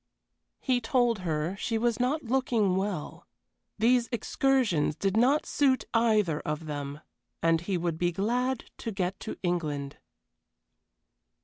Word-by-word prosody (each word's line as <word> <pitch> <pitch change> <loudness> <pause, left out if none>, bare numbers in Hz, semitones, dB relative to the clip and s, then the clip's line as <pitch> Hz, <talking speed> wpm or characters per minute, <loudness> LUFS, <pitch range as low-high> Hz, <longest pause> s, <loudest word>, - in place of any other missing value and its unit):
He 250 -2 +1
told 240 -2 +2
her 165 0 -2
she 225 +2 -1
was 235 +1 0
not 270 +6 0
looking 230 -6 +1
well. 190 -5 -3 0.5
These 235 +2 +3
excursions 235 - +1
did 195 +5 -1
not 260 +7 +3
suit 270 -3 +2
either 215 -9 +3
of 150 +1 -4
them, 145 -1 -5 0.4
and 165 -1 +3
he 185 +1 -1
would 170 -2 -2
be 175 0 +2
glad 245 +7 0 0.2
to 225 - -4
get 190 -1 -2
to - - -6
England. 150 -6 -2
205 Hz, 130 wpm, -28 LUFS, 165-245 Hz, 0.5 s, These